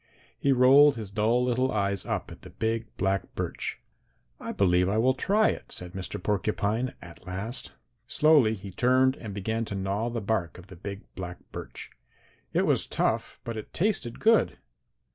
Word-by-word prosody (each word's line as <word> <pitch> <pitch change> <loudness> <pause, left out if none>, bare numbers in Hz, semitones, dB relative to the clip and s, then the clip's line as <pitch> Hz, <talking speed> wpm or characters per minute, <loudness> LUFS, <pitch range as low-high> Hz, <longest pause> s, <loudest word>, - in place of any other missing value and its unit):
He 140 - +1
rolled 135 +3 +7
his 110 -4 -7
dull 110 +4 +2
little 130 +1 +1
eyes 100 -2 -1
up - - -2
at - - -11
the - - -11
big 115 0 -2
black 95 0 -1
birch. - - -4 0.6
'I - - -5
believe 90 -1 +3
I 105 - +1
will 125 +4 +4
try 210 +10 +3
it,' - - -5
said 90 -1 -6
Mr. 95 -1 -4
Porcupine 105 +4 -1
at 85 +1 -13
last. 100 +7 -4 0.3
"Slowly 145 -6 +4
he 100 -1 -9
turned 130 +5 +3
and 110 - -7
began 110 +3 -2
to 100 - -5
gnaw 100 +4 -1
the 120 0 -3
bark 100 -6 -1
of 90 - -12
the - - -10
big 100 +3 -7
black 90 -1 -6
birch. - - -8 0.6
It - - +2
was - - +2
tough, - - -1
but 115 - -5
it 110 - -8
tasted 175 - 0
good. 225 +1 +3
110 Hz, 175 wpm, -27 LUFS, 95-125 Hz, 0.6 s, rolled